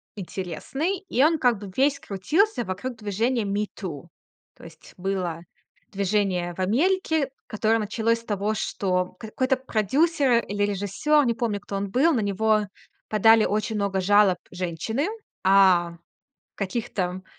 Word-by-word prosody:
интересный, 200 - -4
и 255 - +3
он 315 +1 +3
как 245 -4 +3
бы 200 -2 -8
весь 280 +1 +2
крутился 290 - 0
вокруг 200 +7 -5
движения 220 +3 -1
Me 205 +1 -1
Too. 165 -7 -6 0.5
То - - -18
есть 165 -1 -14
было 180 -3 -2 0.5
движение 195 -3 0
в - - -13
Америке, 310 - +1 0.2
которое 220 0 +1
началось 225 +2 0
с - - -16
того, 205 0 -1
что 180 -3 -1
какой-то 255 +4 -1
продюсер 260 - +2
или 205 0 -2
режиссёр, 205 +9 +1
не 235 - +2
помню, 225 -4 -2
кто 200 - -7
он 200 0 -2
был, 290 +9 +3
на 240 - +1
него 215 +2 +2 0.5
подали 225 +1 +5
очень 215 +1 -1
много 200 -2 0
жалоб 200 -1 +4
женщины, 185 - -2 0.4
а 185 -3 +4 0.6
каких 220 +4 -4
там 185 0 -2
210 Hz, 140 wpm, -25 LUFS, 190-245 Hz, 0.6 s, подали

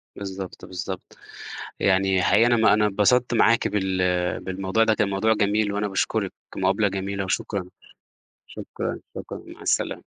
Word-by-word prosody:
بالضبط، 95 -2 -7
بالضبط 95 0 -7 0.6
يعني 95 -1 +3
حقيقي 110 +5 +4
أنا 120 0 +4
ما 110 - +5
أنا 105 0 +3
اتبسطت 115 +5 +2
معاكِ 115 0 +4
بال 95 -2 -1 0.4
بالموضوع 95 +4 0
ده، 110 -1 +3
كان 110 -2 +1
موضوع 110 +3 +2
جميل، 105 0 +1
وأنا 105 +1 -1
باشكرِك 95 - -1 0.2
مقابلة 95 +2 +2
جميلة، 100 0 -3
وشكرًا، 95 +1 -2 0.8
شكرًا، - - -5 0.2
شكرًا - - -7
مع - - -12
السلامة. - - 0
100 Hz, 140 wpm, -24 LUFS, 95-110 Hz, 0.8 s, ما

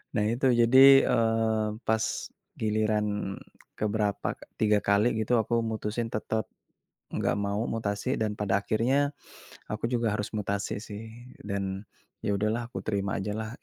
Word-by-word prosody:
Nah 105 -1 +2
itu 130 +3 -1 0.2
jadi, 135 +3 +8
eee, 115 -2 +2 0.2
pas, 110 0 +2 0.6
giliran 105 -2 0 0.4
ke 105 - -1
berapa 105 -1 -1
ka - - -15 0.2
3 105 -1 +3
kali 105 +3 +3
gitu 120 +1 +2
aku 120 - -4
mutusin 110 +1 -3
tetap, 110 0 -1 0.7
gak - - 0
mau 105 +3 -1
mutasi 110 +3 -1
dan 105 -1 +1
pada 100 -2 0
akhirnya, 135 +6 +1 0.6
aku 105 +2 -3
juga 115 -1 +1
harus 105 -1 -2
mutasi 100 0 -2
sih 105 +1 -7 0.4
dan 100 0 -3 0.4
ya - - 0
udahlah 110 +4 0
aku - - -6
terima 100 -2 -1
aja 105 +1 -3
lah. 110 -1 -4
110 Hz, 145 wpm, -28 LUFS, 105-115 Hz, 0.7 s, jadi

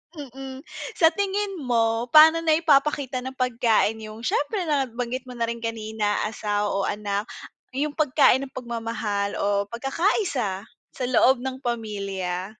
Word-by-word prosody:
Mm, 270 -1 -8 0.3
sa 325 -1 +5
tingin 395 0 -2
mo, 230 -2 +1
pa'no 315 +4 +7
naipapakita 300 -4 +2
ng 260 +1 -7
pagkain, 230 -3 +1
yung, 215 +1 -9
siyempre 355 - 0
nabanggit 255 -4 -2
mo 250 - -9
na 235 - -2
rin 235 0 -2
kanina, 220 -2 -2
asawa 210 -1 -1
o 195 0 0
anak, 205 +1 -2 0.5
yung 295 +2 0
pagkain 275 -2 +3
ng - - -24
pagmamahal 225 -4 -3
o 200 0 0
pagkakaisa 270 - -1 0.3
sa 255 - -4
loob 250 +1 +3
ng 260 0 -4
pamilya? 200 -7 -3
245 Hz, 135 wpm, -24 LUFS, 215-275 Hz, 0.5 s, pa'no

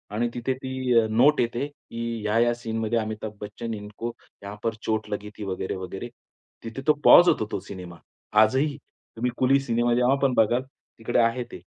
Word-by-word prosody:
आणि 120 +2 +1
तिथे 120 +2 -1
ती 130 -2 +1
अ, 110 - +1
नोट 125 +7 +4
येते, 120 +4 -1
की 115 -5 -6
ह्या-ह्या 115 +3 +2
सीनमध्ये 115 -1 -2
अमिताभ 110 -1 -5
बच्चन 115 +2 -5
इनको 105 +3 -6 0.3
यहाँ 100 +1 -7
पर 115 -1 0
चोट 110 0 -2
लगी 105 0 -4
थी 105 - -6
वगैरे-वगैरे. 95 +3 -4 0.5
तिथे 115 +4 -6
तो 150 - +7
पॉज 175 - +9
होतो 110 -9 +1
तो - - -2
सिनेमा. 90 -3 -9 0.5
आजही. 135 +6 +2 0.4
तुम्ही 120 +2 -1
कुली 135 +2 +4
सिनेमा 120 -2 +1
जेव्हा 125 +2 +3
पण 135 -2 +3
बघाल, 120 +2 +3
तिकडे 120 -3 -4
आहे 115 +2 +2
ते. - - -9
115 Hz, 175 wpm, -25 LUFS, 110-125 Hz, 0.5 s, पॉज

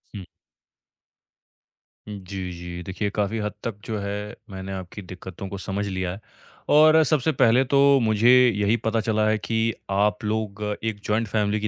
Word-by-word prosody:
हुँ। 95 -3 -7 1.8
हुँ, 105 -1 -6
जी, 95 -1 -6
जी, 85 0 -7
देखिए, 95 +3 -3
काफ़ी 105 +2 0
हद 105 0 -2
तक 115 - -3
जो 110 - -3
है, 100 +1 -5
मैंने 95 0 -7
आपकी 95 +2 -7
दिक्कतों 95 0 -9
को 100 - -6
समझ 100 +1 -3
लिया 95 -2 -2
है 95 - -8 0.5
और 155 +1 +6
सबसे 155 0 +1
पहले 125 -2 +4
तो 140 +2 +2 0.2
मुझे 110 0 +3 0.2
यही 105 +3 +2
पता 115 0 -1
चला 110 0 +1
है 110 - +2
कि 110 +1 -1 0.2
आप 105 +2 +1
लोग 105 -1 -2 0.2
एक 110 -2 -2
जॉइंट 110 +2 0
फ़ैमिली 105 0 0
की 105 - -2
105 Hz, 170 wpm, -24 LUFS, 95-110 Hz, 1.8 s, और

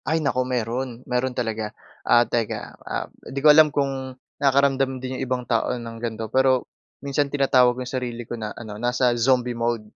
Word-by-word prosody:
Ay 160 +4 +1
naku, 140 -5 0
meron 125 +1 -3
meron 125 +1 -1
talaga, 110 -3 -3 0.2
ah, 120 0 +4
teka, 115 -3 -3
ah, - - -4 0.2
'di 140 - -10
ko 150 +2 +7
alam 155 0 +7
kung 135 -2 -2 0.2
nakakaramdam 135 -1 +3
din 130 0 -5
yung - - 0
ibang 125 -1 -1
tao 115 +1 0
ng 115 -1 -7
gan'to, 115 -2 -3
pero 130 -1 +3 0.4
minsan, 140 +1 0
tinatawag 130 -3 +3
yung 130 - -4
sarili 120 -2 -4
ko - - -7
na, 110 -2 -4
ano, 110 -2 -8
nasa 125 0 +2
zombie 125 +1 +2
mode. 115 -2 -1
125 Hz, 180 wpm, -23 LUFS, 120-135 Hz, 0.4 s, ko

